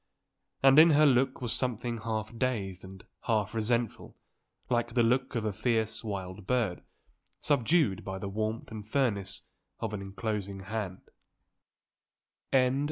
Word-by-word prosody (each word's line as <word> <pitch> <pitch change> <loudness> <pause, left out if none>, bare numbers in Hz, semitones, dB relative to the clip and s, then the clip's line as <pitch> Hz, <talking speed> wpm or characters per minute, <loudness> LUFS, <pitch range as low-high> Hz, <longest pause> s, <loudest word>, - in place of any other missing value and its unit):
And 135 +2 +8
in 165 +2 +9
her 155 - +6
look 130 -1 +3
was 120 -2 -1
something 120 -2 -2
half 110 0 -3
dazed 105 -7 -2
and 95 0 -11 0.2
half 105 -2 +1
resentful 115 0 -1 0.5
like 120 -1 0
the 120 - +4
look 125 +3 +1
of 115 -2 -1
a 105 - -1
fierce 110 +1 0
wild 95 -2 -5
bird, 115 -8 0 0.6
subdued 145 - +2
by 95 -1 -4
the 100 - -5
warmth 110 +3 -3
and 110 -1 -6
firmness 105 -5 -1 0.4
of 110 -2 -3
an 105 - -3
enclosing 100 0 -4
hand. 100 -2 -4
110 Hz, 135 wpm, -30 LUFS, 100-120 Hz, 0.6 s, in